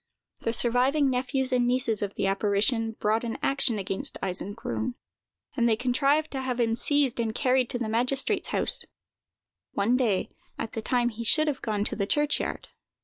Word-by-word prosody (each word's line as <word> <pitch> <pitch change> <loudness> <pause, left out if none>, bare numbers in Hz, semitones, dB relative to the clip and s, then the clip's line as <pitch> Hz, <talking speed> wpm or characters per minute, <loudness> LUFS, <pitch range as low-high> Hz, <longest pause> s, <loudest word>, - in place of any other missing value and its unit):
The 230 - -1
surviving 255 +5 +3
nephews 260 +1 -1
and 245 -1 +2
nieces 245 -4 +1
of 200 -1 -3
the - - -1
apparition 210 +4 +1
brought 220 +1 0
an 230 -1 -3
action 270 -4 +1
against 195 -1 -3
Eisengrun, 205 +5 -2 0.6
and 235 -3 +2
they 220 - +3
contrived 275 +6 +1
to 270 - -3
have 255 -2 -3
him 230 -1 +2
seized 275 0 +2
and 225 -1 -1
carried 255 -3 +2
to - - -2
the 240 -2 -3
magistrate's 250 +5 0
house, - - -1 0.9
one 230 +5 +2
day, 220 -7 0 0.3
at 225 - -4
the 225 - -4
time 240 +2 +1
he 230 0 -6
should 310 +7 +3
have 285 -3 -1
gone 210 -2 -1
to - - -1
the 200 -2 -1
churchyard. 295 +3 0
240 Hz, 175 wpm, -27 LUFS, 220-260 Hz, 0.9 s, surviving